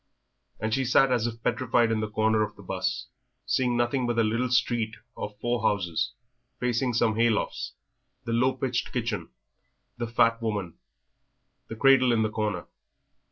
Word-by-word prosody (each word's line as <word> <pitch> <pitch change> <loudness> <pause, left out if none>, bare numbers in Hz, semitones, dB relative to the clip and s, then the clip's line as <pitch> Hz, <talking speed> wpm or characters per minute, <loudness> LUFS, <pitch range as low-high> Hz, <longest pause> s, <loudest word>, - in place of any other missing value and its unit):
And 110 +1 -1
she 135 - +2
sat 130 +1 +4
as 120 -2 +2
if 115 0 -7
petrified 120 -2 +2
in 110 - +1
the 110 0 -2
corner 110 0 +2
of 110 - -2
the - - -14
'bus, - - -2 0.4
seeing 125 -2 +1
nothing 120 +1 +1
but 120 -1 -1
a 115 - +4
little 115 +4 0
street 115 -2 +1 0.2
of 105 0 -6
four 120 +1 -1
houses, 90 -5 0 0.5
facing 125 0 0
some 115 -2 +3
haylofts, 115 -1 0 0.5
the 115 - -2
low 125 +3 +3
pitched 130 -1 -2
kitchen, 110 -8 -2 0.7
the 120 - -2
fat 115 0 +2
woman, 100 -7 -2 0.9
the 115 - -6
cradle 135 0 +5
in 115 -2 +3
the 110 - -1
corner. 105 -5 -2
115 Hz, 160 wpm, -27 LUFS, 110-125 Hz, 0.9 s, cradle